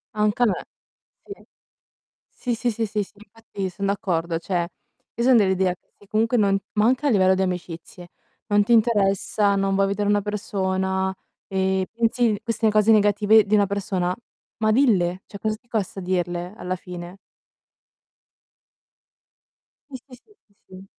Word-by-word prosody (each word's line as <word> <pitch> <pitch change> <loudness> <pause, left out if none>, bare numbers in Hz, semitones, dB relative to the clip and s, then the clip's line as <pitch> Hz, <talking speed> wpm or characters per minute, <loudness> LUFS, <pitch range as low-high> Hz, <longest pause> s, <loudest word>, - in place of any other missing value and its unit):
Anche 210 +3 +1
a - - +6
me. 200 -6 -1 0.6
Sì. 400 0 -11 0.8
Sì, 240 -2 -3
sì, 240 +1 -1
sì, 225 +1 -2
sì, 210 0 -1
sì, - - -16
infatti 205 -2 -7
son 195 +2 -4
d'accordo, 170 -4 -1
cioè 175 -1 -2 0.5
io 235 - -1
son 255 0 +6
dell'idea 190 -3 +2
che - - -46
se 205 - -21
comunque 225 +4 +1
non 200 -2 +3 0.2
ma 210 0 +2
anche 255 +4 +2
a - - +3
livello 190 -5 +4
di 190 - 0
amicizie. 175 -1 -6 0.4
Non 205 -1 +3
ti 235 - +2
interessa, 205 -2 +2
non 195 0 0
vuoi 195 0 +2
vedere 205 +1 -1
una 205 0 +3
persona, 190 -2 -2 0.3
e 190 -1 0
pensi 230 -2 +1
queste 230 -1 +1
cose 215 +1 +4
negative 210 0 +5
di 205 - -3
una 205 -2 +3
persona, 190 -2 -2 0.4
ma 215 -1 +2
dille! 190 -8 +2
Cioè 200 - -9
cosa 215 +1 -1
ti 240 +2 -25
costa 205 -4 -3
dirle, 175 0 -2
alla 185 +1 -3
fine? 180 0 -9 2.7
Sì, 265 - -7
sì, 255 - -13
sì, 425 - -25
sì, 205 - -35
sì. 190 +1 -12
200 Hz, 160 wpm, -23 LUFS, 190-220 Hz, 2.7 s, a